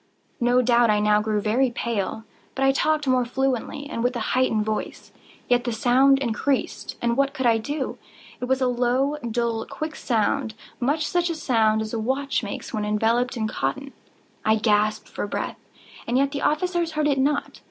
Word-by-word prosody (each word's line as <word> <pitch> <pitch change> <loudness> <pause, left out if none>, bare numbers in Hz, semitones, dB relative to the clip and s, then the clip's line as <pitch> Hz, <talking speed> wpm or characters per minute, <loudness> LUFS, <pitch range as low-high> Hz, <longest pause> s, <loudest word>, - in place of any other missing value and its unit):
No 245 +1 +3
doubt 240 -1 +4
I 210 0 +3
now 210 0 +3
grew 215 -1 0
very 235 +6 +2
pale;—but 230 +3 -4
I 270 - +5
talked 300 +1 +1
more 255 -1 +3
fluently, 265 +3 -2
and 235 -6 -4
with 245 +1 +1
a - - -1
heightened 225 -5 +2
voice. 215 0 -4 0.4
Yet 245 -1 +3
the 240 - -2
sound 255 +4 +4
increased—and 240 -1 -1
what 275 +1 +1
could 260 - -2
I 230 -1 +4
do? 285 +4 -4 0.4
It - - -3
was 265 +1 0
a 255 - +3
low, 250 +4 +1
dull, 235 -2 -2
quick 310 0 -5
sound—much 245 +5 -1
such 350 -1 +1
a 335 - -2
sound 220 -7 +2
as 215 - -7
a 230 - -1
watch 270 +5 -1
makes 200 -3 -6
when 215 - -1
enveloped 225 +4 +1
in 220 -1 -1
cotton. 275 +5 -3 0.5
I 220 +1 +4
gasped 215 0 +1
for - - -4
breath—and 240 +3 -5
yet 275 +1 +2
the 285 - -3
officers 340 +1 0
heard 305 -1 0
it 280 -2 +1
not. 285 +2 0
245 Hz, 175 wpm, -24 LUFS, 220-275 Hz, 0.5 s, I